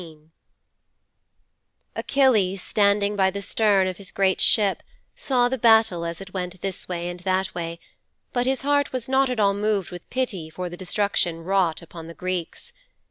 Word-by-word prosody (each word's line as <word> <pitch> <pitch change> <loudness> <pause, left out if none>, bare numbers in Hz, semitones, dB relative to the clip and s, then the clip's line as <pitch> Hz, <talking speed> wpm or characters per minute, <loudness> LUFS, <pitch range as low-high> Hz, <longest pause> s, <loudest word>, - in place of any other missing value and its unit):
XIV 155 -2 -14 1.7
Achilles, 215 -9 +2
standing 205 0 +2
by 190 -1 +3
the 200 +1 -5
stern 205 -2 +2
of 185 -1 -3
his 195 -2 -8
great 190 -1 +1
ship, 205 -3 +3 0.3
saw 250 -3 +2
the 260 +1 -3
battle 220 -7 +4
as 170 0 -4
it 195 -1 -10
went 180 -1 -4
this 195 -2 -5
way 175 -1 -3
and 175 0 -6
that 185 +1 -1
way, 170 -1 -5 0.5
but 245 -1 +1
his 265 0 +1
heart 285 +1 +1
was 255 -3 -4
not 265 0 +2
at 250 -3 -2
all 200 -1 +4
moved 205 -2 -1
with 175 -1 -10
pity 205 -11 -2
for 180 +3 -5
the 175 - -8
destruction 180 -3 -1
wrought 185 -3 +1
upon 165 0 -10
the 165 - -10
Greeks. 180 -2 -5
195 Hz, 175 wpm, -24 LUFS, 175-220 Hz, 1.7 s, battle